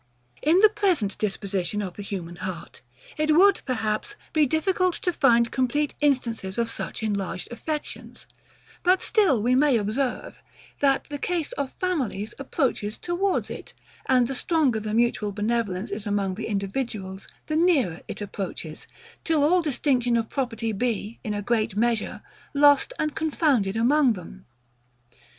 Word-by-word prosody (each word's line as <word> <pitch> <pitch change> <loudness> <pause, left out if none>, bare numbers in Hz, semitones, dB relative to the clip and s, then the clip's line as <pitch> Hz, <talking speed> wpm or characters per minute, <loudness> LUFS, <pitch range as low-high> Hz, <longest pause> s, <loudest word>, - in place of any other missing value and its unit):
In 315 +4 +4
the 430 - +8
present 370 - +1
disposition 200 -1 -2
of 190 -3 -4
the - - -7
human 175 -4 -6
heart, 185 -3 -7 0.4
it 305 0 +2
would, 390 +3 +5
perhaps, 225 - -2 0.2
be 305 -2 +4
difficult 365 +4 +1
to 355 - -1
find 235 -6 +4
complete 275 +3 0
instances 235 -9 0
of 230 -1 0
such - - -5
enlarged 200 -3 -3
affections; 300 +6 -6 0.6
but 365 +1 +3
still 335 - +3
we 245 +2 +3
may 270 -1 +4
observe, 230 +5 -2 0.4
that 275 -1 +3
the 290 -1 -5
case 345 -2 -1
of 280 -2 -4
families 265 - -1
approaches 255 -6 -1
towards 360 +2 -1
it; - - -8 0.3
and 250 -2 +4
the 270 - -3
stronger 275 -4 +2
the 215 0 -3
mutual 230 -3 +1
benevolence 210 -2 -1
is 205 +1 -4
among 200 -2 0
the 215 +4 -5
individuals, 195 -2 -3 0.2
the 310 - -2
nearer 300 - +2
it - - -7
approaches; 190 -6 -6 0.4
till 315 -3 +2
all 350 +4 +4
distinction 255 -5 +1
of 225 -1 -2
property 230 -4 -2
be, 220 0 -2
in 210 -1 -2
a 205 - -3
great 220 -3 0
measure, 230 -1 0 0.3
lost 285 - +5
and 305 -1 -1
confounded 285 - +1
among 255 +3 +4
them. 185 0 -11
240 Hz, 150 wpm, -25 LUFS, 205-300 Hz, 0.6 s, the